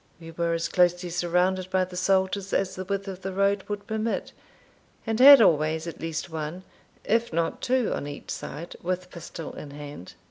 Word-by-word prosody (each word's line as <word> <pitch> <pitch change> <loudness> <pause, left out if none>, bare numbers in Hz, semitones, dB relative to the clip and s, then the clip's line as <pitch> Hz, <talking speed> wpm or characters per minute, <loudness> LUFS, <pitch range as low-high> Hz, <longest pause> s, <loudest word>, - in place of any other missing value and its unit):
We 165 -1 -10
were 170 0 0
as 165 0 -1
closely 175 0 +2
surrounded 180 +2 +1
by 185 0 +2
the 180 0 -11
soldiers 190 +1 +1
as 195 -1 +1
the 185 - -5
width 200 +1 -3
of 190 -1 -6
the 190 - -4
road 200 0 +2
would 205 -1 -4
permit, 220 +1 -2 0.7
and 225 0 -1
had 275 -2 +10
always 160 -2 +2
at 170 - -7
least 165 -1 -3
one, 160 +3 -5 0.4
if 230 +2 +1
not 165 0 -1
two, 255 -2 +1
on 145 - -4
each 145 0 -7
side, 170 +3 -6
with 180 +1 -3
pistol 170 -1 -8
in 150 - -8
hand. 145 -9 -9
180 Hz, 185 wpm, -26 LUFS, 165-195 Hz, 0.7 s, had